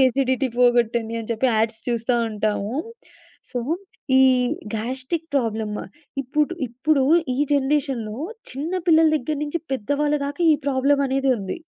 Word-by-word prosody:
Acidity 260 +1 0
పోగొట్టండి 235 -2 +2
అని 225 - -8
చెప్పి 230 +3 +1
ads 220 0 0
చూస్తా 235 +1 0 0.2
ఉంటాము. 210 +1 -1 0.8
సో, 250 - -1 0.6
ఈ - - +7 0.5
గాస్ట్రిక్ 260 +9 -3
ప్రాబ్లమ్ 220 -5 -1 0.5
ఇప్పుడు 300 +6 0
ఇప్పుడు 270 +4 +1 0.3
ఈ - - -4 0.2
జనరేషన్‌లో 265 -6 0 0.3
చిన్న 290 +7 -4 0.2
పిల్లల 320 0 +6
దగ్గర 300 +2 -3
నుంచి 300 +3 -2
పెద్ద 235 -6 -4
వాళ్ల 295 0 +2
దాకా 290 +4 -6
ఈ - - +5
ప్రాబ్లమ్ 280 +1 +2
అనేది 270 +1 0
ఉంది. 195 - -5
260 Hz, 135 wpm, -23 LUFS, 225-285 Hz, 0.8 s, ఈ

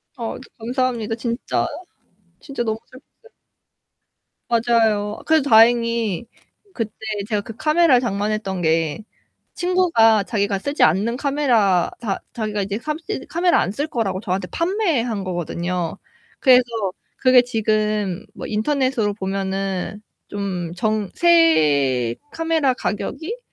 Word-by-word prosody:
아 230 -3 -4 0.2
감사합니다. 235 -2 -1
진짜 235 +1 -2 0.7
진짜 275 -5 -4
너무 220 -1 -1
슬펐어요. 295 - -19 1.2
맞아요. 225 -3 +1
그래도 315 -3 +2
다행히 230 -3 +4 0.5
그때 225 -7 -4 0.3
제가 210 -3 0
그 225 - -10
카메라를 305 -2 +4
장만했던 205 -4 -2
게 160 +2 0 0.5
친구가 335 - +3
자기가 200 -2 -1
쓰지 285 +9 -2
않는 205 +9 +3
카메라 245 -11 +2
자 205 -5 -2 0.2
자기가 215 -3 -2
이제 200 +2 -3
캄쓰 315 - -5
카메라 345 +2 +2
안 175 - -1
쓸 290 +8 -2
거라고 205 -9 -2
저한테 185 -3 -3
판매한 315 - -1
거거든요. 175 -1 -3 0.4
그래서 255 -2 +6 0.5
그게 255 -1 +5
지금 215 -4 -1
뭐 - - -7
인터넷으로 235 -1 0
보면은 195 0 -3 0.3
좀 185 -4 -4
정 215 -1 0
새 145 - +3 0.2
카메라 325 -4 +1
가격이 320 - -4
225 Hz, 265 characters per minute, -21 LUFS, 195-260 Hz, 1.2 s, 그래서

